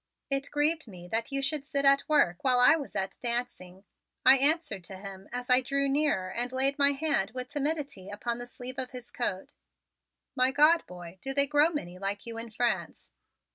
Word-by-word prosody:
It 275 +1 -1
grieved 300 0 0
me 180 -4 -12
that 230 +5 -2
you 275 0 0
should 280 +1 0
sit 280 -1 -2
at 275 +1 +3
work 175 - +2
while 255 -2 +3
I 250 +5 +6
was 290 -4 -7
at 190 0 -4
dancing," 235 -7 -3 0.4
I 265 +1 +8
answered 295 - +2
to 190 - -8
him 195 0 -10
as 245 0 -5
I 250 0 +6
drew 275 +2 -1
nearer 270 -10 0
and 245 +4 -2
laid 270 +2 +2
my 280 0 +5
hand 275 -9 +1
with 255 0 -5
timidity 285 -9 -2
upon 235 +3 -4
the 245 - -7
sleeve 255 +2 -6
of 255 -1 -3
his 250 -1 -11
coat. 195 -6 -3 0.8
"My 255 +1 +3
God, 305 +4 +4
boy, 175 0 -11
do 270 0 -3
they 280 0 +4
grow 295 +2 +3
many 180 - -6
like 200 +1 -4
you 230 -1 -5
in 230 0 -6
France?" 235 +2 -3
255 Hz, 200 wpm, -28 LUFS, 205-280 Hz, 0.8 s, I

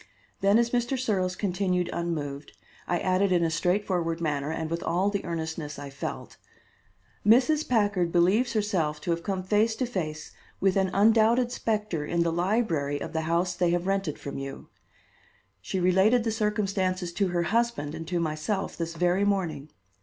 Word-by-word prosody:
Then 200 +2 +4
as 235 0 +2
Mr. 245 +2 0
Searles 190 -7 0
continued 180 -2 0
unmoved, 150 -4 -4 0.3
I 175 - +1
added 185 +2 +1
in 175 -2 +3
a 165 - +1
straightforward 175 -1 0
manner, 145 -3 -1
and 160 0 -3
with 170 +1 -3
all 185 +4 +1
the 200 -1 -2
earnestness 160 -3 -4
I 140 -1 -7
felt: 140 - -6 0.9
"Mrs. 265 +8 +4
Packard 205 -7 +2
believes 190 +9 +3
herself 185 -9 0
to 175 - -2
have 170 0 -1
come 190 0 -3
face 215 +4 +2
to 255 - -1
face 155 -9 -4 0.3
with 190 -1 +2
an 190 -1 +2
undoubted 225 +4 +4
specter 210 -9 -2
in 170 +3 0
the 165 -1 0
library 170 -6 0
of 160 - -6
the 160 - 0
house 175 +2 +1
they 175 -1 +1
have 175 +1 0
rented 195 -5 -1
from 140 -1 -6
you. 135 0 -7 0.9
She 190 - -3
related 190 +7 +4
the 225 - 0
circumstances 195 -5 -1
to 195 +2 +1
her 175 -1 0
husband 225 -7 0
and 165 0 -7
to 175 0 -1
myself 160 +5 -2
this 165 0 -4
very 180 +3 +2
morning. 175 -8 -1
185 Hz, 170 wpm, -27 LUFS, 165-210 Hz, 0.9 s, Then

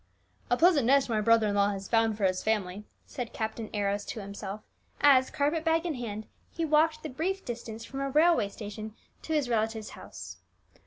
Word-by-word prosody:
"A 245 - +3
pleasant 320 -7 +4
nest 275 0 +4
my 220 -2 +1
brother 230 0 +4
in 205 - 0
law 200 0 +3
has 195 -1 -5
found 225 -2 +2
for 210 - -4
his 185 -1 +1
family," 210 -2 -1 0.2
said 245 -3 -6
Captain 220 0 -4
Arrows 205 -1 -1
to - - -5
himself, 200 0 -6 0.4
as, 265 -2 +6
carpet 300 +3 0
bag 325 +1 +2
in 335 - -1
hand, 220 -4 -5 0.2
he 330 - -3
walked 310 +1 +2
the - - -3
brief 370 +8 -2
distance 230 -2 -6
from 270 - -7
a 275 0 -1
railway 305 -6 +4
station 215 +1 -8 0.3
to 320 - -4
his 295 -4 +1
relative's 220 -2 -1
house. - - -10
230 Hz, 195 wpm, -29 LUFS, 210-290 Hz, 0.4 s, as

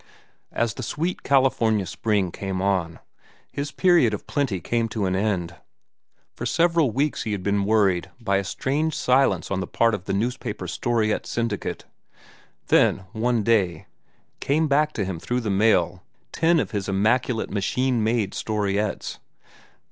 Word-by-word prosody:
As 115 -2 0
the 130 - -7
sweet 160 +9 -3
California 115 -7 +2
spring 95 0 -1
came 95 0 -4
on, 95 -4 0 0.5
his 140 +1 -4
period 170 - +3
of - - -10
plenty 135 -10 -1
came 115 +6 -1
to 110 -3 -2
an 95 0 0
end. 95 -4 -1 0.8
For - - -8
several 165 -3 +3
weeks 140 +6 -1
he 110 - -2
had 95 -3 -4
been 100 0 +1
worried 100 -5 +2
by 100 -4 +1
a 100 - -1
strange 145 +10 -1
silence 130 -3 +2
on 95 - 0
the 95 - -3
part 115 -1 +2
of 100 -3 -4
the - - -2
newspaper 115 +5 -2
storiette 115 -3 0
syndicate. 115 -4 -3 0.8
Then, 95 - +3
one 115 0 0
day, 95 -8 +1 0.5
came 155 +3 +1
back 150 +2 +2
to 100 - -2
him 95 -3 -4
through 125 +8 -2
the 110 -3 -2
mail 95 -3 +2 0.3
ten 165 0 +3
of - - -2
his 100 -2 -3
immaculate 110 +4 +1
machine 120 +4 0
made 110 -2 0
storiettes. 105 -1 -2
110 Hz, 155 wpm, -24 LUFS, 100-125 Hz, 0.8 s, period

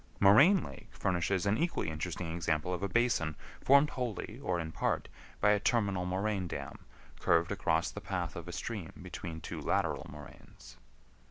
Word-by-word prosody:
Moraine 140 - +7
Lake 105 - -10
furnishes 95 0 0
an 100 +4 +2
equally 165 - 0
interesting 80 +1 -4
example 80 0 -1
of 90 - -3
a 100 - -1
basin 105 -9 +1 0.3
formed 140 +2 +6
wholly, 120 -2 -4
or 90 -9 -1
in 80 -1 -4
part, - - -1 0.3
by 105 - +5
a 105 - +3
terminal 100 -5 +1
moraine 95 0 -1
dam 70 -4 -7 0.3
curved 85 0 +3
across - - +1
the - - -7
path - - -3
of - - -7
a - - -5
stream 105 -8 -5
between 90 -2 -6
two 80 - -6
lateral - - 0
moraines. 75 -1 -13
95 Hz, 165 wpm, -32 LUFS, 85-110 Hz, 0.3 s, Moraine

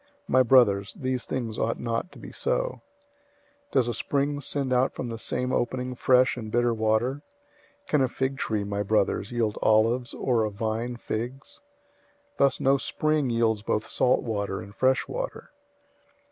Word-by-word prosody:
My 130 - +4
brothers, 110 -6 +4
these 130 -1 -3
things 115 -4 -3
ought 115 - -1
not 115 +8 -2
to - - -14
be - - -10
so. - - -1 0.9
003:011 - - -38
Does 130 -3 +3
a 120 - -1
spring 145 +4 -1
send 135 -1 -1
out 125 +2 +2
from 120 - -4
the 115 -1 -5
same 125 +2 -1
opening 125 +1 -1
fresh 125 +1 +3
and 110 -3 -6
bitter 120 0 +2
water? 110 +5 0 0.6
003:012 - - -36
Can 150 - +3
a 130 - +3
fig 130 +2 -2
tree, 105 -2 -1
my 100 0 -2
brothers, 105 0 0
yield 115 -3 -1
olives, 115 +3 +2
or 120 -4 +1
a 110 - 0
vine 110 +3 -3
figs? 120 +3 -5 0.8
Thus 140 -1 +3
no 135 +1 +3
spring 155 0 0
yields 115 -2 +1
both 105 0 -1
salt 125 - +2
water 100 -4 -2
and 100 -2 -10
fresh 130 +3 +2
water. - - -5
120 Hz, 170 wpm, -26 LUFS, 110-130 Hz, 0.9 s, My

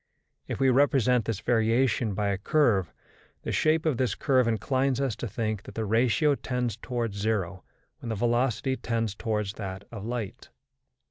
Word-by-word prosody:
If - - -4
we 135 -1 +4
represent 125 -3 +3
this 110 -3 -2
variation 115 -1 +2
by 105 0 0
a 100 - 0
curve, 105 - +2 0.5
the - - -3
shape 155 +1 +2
of 150 -6 +1
this 130 -1 0
curve 130 -4 +2
inclines 130 +4 +1
us 135 -6 0
to 120 - -4
think 110 -1 -2
that - - -12
the 110 - -2
ratio 125 +8 +3
tends 125 -5 -2
toward 120 -2 -3
zero 100 -3 -2 0.4
when 120 - -7
the 110 - -1
velocity 120 +3 +1
tends 115 -3 -1
towards 105 -1 -2
that 95 -1 -5
of 110 -4 -7
light. 115 -3 -5
115 Hz, 170 wpm, -27 LUFS, 105-130 Hz, 0.5 s, we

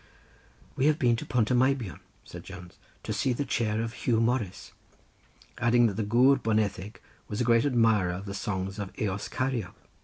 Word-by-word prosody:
"We 135 - +2
have 155 -1 +3
been 120 -7 +3
to - - -7
Pont 120 -1 +1
y - - +3
Meibion," 125 - +1 0.3
said - - -10
Jones, 90 -2 -11 0.2
"to 110 - -3
see 120 +5 0
the 140 +4 -2
chair 110 -3 -1
of 115 0 -5
Huw 115 -3 0
Morris," 115 -5 -1 0.9
adding 120 0 +4
that 110 - +1
the 110 - -1
Gwr 125 +5 +4
Boneddig 105 -2 -1 0.3
was 105 - -4
a - - +2
great 115 +1 +3
admirer 110 -8 +2
of 95 +3 -6
the 100 - -6
songs 95 0 -4
of 100 -2 -5
the - - -4
Eos 100 -1 -3
Ceiriog. 130 -8 -2
115 Hz, 190 wpm, -28 LUFS, 100-125 Hz, 0.9 s, adding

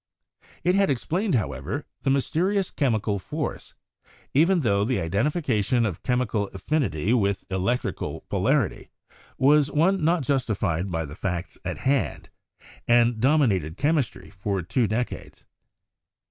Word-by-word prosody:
It 180 +2 +3
had 195 0 +3
explained, 170 - 0
however, 70 - -2 0.2
the - - 0
mysterious 180 +8 +1
chemical 110 -7 0
force, - - -5 0.6
even 170 +5 +4
tho 100 -5 +2
the 125 +3 0
identification 115 - +1
of 95 -6 -3
chemical 125 -5 0
affinity 100 - 0
with 100 -5 0
elec 95 +6 0
trical - - -5
polarity - - 0 0.5
was 145 +1 +4
one 170 +4 +2
not 165 -1 +2
justified 105 - 0
by 80 -2 -2
the 70 - -9
facts 90 0 -4
at - - -4
hand, 135 0 -1 0.6
and 120 -1 +4
dominated 110 - +2
chemistry 145 -3 -1
for 95 -1 -3
two 115 +7 +1
decades. 115 +4 -4
120 Hz, 125 wpm, -25 LUFS, 100-150 Hz, 0.6 s, even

